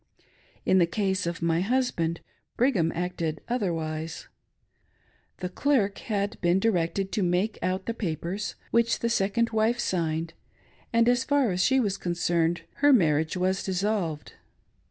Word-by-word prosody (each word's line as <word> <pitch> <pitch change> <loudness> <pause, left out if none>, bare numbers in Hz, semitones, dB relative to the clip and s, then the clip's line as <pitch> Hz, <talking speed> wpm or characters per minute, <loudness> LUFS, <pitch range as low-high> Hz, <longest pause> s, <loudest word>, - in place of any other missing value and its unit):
In 190 - +4
the 170 - +4
case 190 -1 -1
of 170 0 -4
my 165 0 +2
husband, 195 -8 0 0.4
Brigham 210 -11 +2
acted 170 -3 -2
otherwise. 165 -8 -3 1.1
The 180 - -4
clerk 210 -2 +1
had 205 -1 -3
been 175 +2 +3
directed 195 -2 0
to 210 - -1
make 180 +4 0
out 185 +2 -1
the 230 - -2
pa 185 -8 -2
pers, 195 +4 -4 0.2
which 235 0 +3
the 235 - +1
second 230 +1 +1
wife 220 +2 +2
signed, 165 -6 -1 0.6
and, 230 0 +3
as 245 +1 +3
far 285 -6 +2
as 180 0 0
she 265 0 +3
was 200 -5 0
con 175 - -2
cerned, 170 -1 +1 0.2
her 290 0 +5
marriage 160 - +3
was 185 +1 +1
dissolved. 185 -5 -2
190 Hz, 150 wpm, -27 LUFS, 170-225 Hz, 1.1 s, her